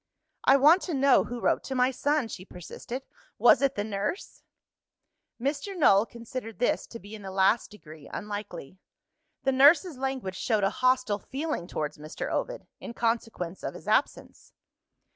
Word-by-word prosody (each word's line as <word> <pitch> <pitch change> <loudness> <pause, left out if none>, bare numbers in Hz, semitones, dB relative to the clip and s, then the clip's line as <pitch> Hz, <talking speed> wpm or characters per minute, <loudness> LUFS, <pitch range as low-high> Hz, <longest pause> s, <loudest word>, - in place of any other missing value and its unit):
"I 270 - +7
want 310 +7 +6
to 325 - -1
know 275 -1 +4
who 245 0 -6
wrote - - +1
to 265 - -4
my 250 +1 +3
son," 285 0 0
she 190 -4 -8
persisted. 200 +8 -8 0.3
"Was 240 +3 +6
it 275 -1 +1
the 205 - -1
nurse?" 210 - -4 1.0
Mr. 285 - -3
Null 215 - +5
considered 235 -1 -8
this 245 - 0
to 230 - -9
be 205 +3 -12
in 215 - -8
the 195 - -7
last 190 +4 +2
degree 155 -8 -13
unlikely. 205 -5 -7 0.6
The 270 - +2
nurse's 290 +3 +5
language 260 -9 -3
showed 215 -1 0
a 195 - +2
hostile 255 -5 +1
feeling 275 - -4
towards 150 -3 -4
Mr. 155 +2 -6
Ovid, - - -3
in 235 - -8
consequence 225 -6 -2
of - - -5
his - - -12
absence. - - -1
235 Hz, 160 wpm, -27 LUFS, 200-270 Hz, 1.0 s, I